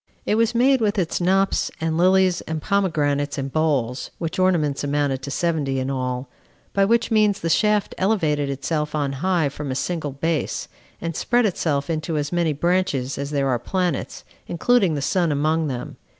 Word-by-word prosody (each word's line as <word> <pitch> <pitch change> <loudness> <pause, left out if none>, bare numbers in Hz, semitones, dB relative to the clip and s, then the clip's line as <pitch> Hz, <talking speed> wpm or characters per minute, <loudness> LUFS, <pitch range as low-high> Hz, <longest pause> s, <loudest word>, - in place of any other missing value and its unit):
It - - +1
was 230 +2 +2
made 260 +2 +4
with 210 -1 +1
its 180 -1 -1
knops, 195 +2 +2
and 160 -1 -1
lilies, 185 +1 +3
and 160 0 -2
pomegranates, 150 -7 0
and 135 -1 -4
bowls 140 -6 0
[which 165 +1 -4
ornaments 165 -7 +1
amounted 145 -2 0
to 135 - -6
seventy 145 -3 0
in 130 +1 -2
all]; 125 -1 -3 0.5
by 195 0 +3
which 230 +3 +2
means 215 -2 +3
the 165 - -1
shaft 210 +3 +2
elevated 155 -8 +1
itself 150 +2 -2
on 145 -2 0
high 165 +3 +1
from 145 0 -6
a 130 - -2
single 155 0 -2
base, 160 +3 -2 0.3
and 165 -1 -4
spread 240 +5 +2
itself 155 -7 0
into 160 -1 -2
as 145 0 -2
many 170 -2 +1
branches 150 -5 0
as 140 0 -3
there 140 -2 0
are 125 -2 +1
planets, 180 +6 -2 0.2
including 190 -1 +2
the 140 - -2
sun 175 +1 +1
among 155 +2 +1
them. 125 -3 -5
160 Hz, 180 wpm, -22 LUFS, 140-185 Hz, 0.5 s, made